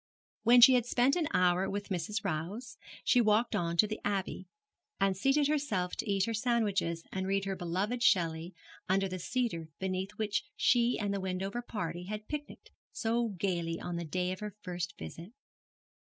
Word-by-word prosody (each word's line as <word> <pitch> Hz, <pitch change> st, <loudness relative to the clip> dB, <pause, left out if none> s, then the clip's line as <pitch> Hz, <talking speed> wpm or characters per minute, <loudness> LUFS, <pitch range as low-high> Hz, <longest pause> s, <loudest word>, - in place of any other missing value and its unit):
When 245 Hz, +1 st, +6 dB
she 255 Hz, +2 st, +10 dB
had 245 Hz, -2 st, +2 dB
spent 250 Hz, +3 st, +3 dB
an 335 Hz, -4 st, +1 dB
hour 180 Hz, +1 st, +3 dB
with 200 Hz, +1 st, -4 dB
Mrs. 195 Hz, +3 st, -2 dB
Rowse, 195 Hz, +10 st, -3 dB, 0.3 s
she 245 Hz, -, +4 dB
walked 215 Hz, +1 st, +3 dB
on 170 Hz, 0 st, -1 dB
to 215 Hz, -, +6 dB
the 215 Hz, 0 st, -4 dB
Abbey, 195 Hz, -2 st, -2 dB, 0.5 s
and 195 Hz, -1 st, +2 dB
seated 275 Hz, +8 st, +3 dB
herself 250 Hz, -12 st, 0 dB
to 225 Hz, -, -3 dB
eat 195 Hz, -1 st, +2 dB
her 230 Hz, -, -2 dB
sandwiches 205 Hz, -8 st, 0 dB
and 190 Hz, 0 st, -2 dB
read 195 Hz, 0 st, 0 dB
her 195 Hz, -1 st, -2 dB
beloved 190 Hz, +7 st, -2 dB
Shelley 170 Hz, -4 st, +2 dB, 0.3 s
under 195 Hz, +1 st, +2 dB
the 185 Hz, 0 st, -5 dB
cedar 195 Hz, -6 st, -2 dB
beneath 190 Hz, +1 st, -3 dB
which 215 Hz, -1 st, -1 dB
she 240 Hz, 0 st, +3 dB
and 205 Hz, -2 st, -1 dB
the 200 Hz, -, -1 dB
Wendover 190 Hz, +5 st, -3 dB
party 180 Hz, -7 st, -4 dB
had 210 Hz, +2 st, -6 dB
picnicked 295 Hz, -1 st, -7 dB, 0.2 s
so 235 Hz, +1 st, 0 dB
gaily 170 Hz, -3 st, -1 dB
on 175 Hz, -, -4 dB
the 170 Hz, -, -3 dB
day 180 Hz, +3 st, -1 dB
of 185 Hz, -, -5 dB
her 210 Hz, -1 st, -6 dB
first 180 Hz, -2 st, -4 dB
visit. 165 Hz, -, -9 dB
195 Hz, 180 wpm, -32 LUFS, 180-230 Hz, 0.5 s, she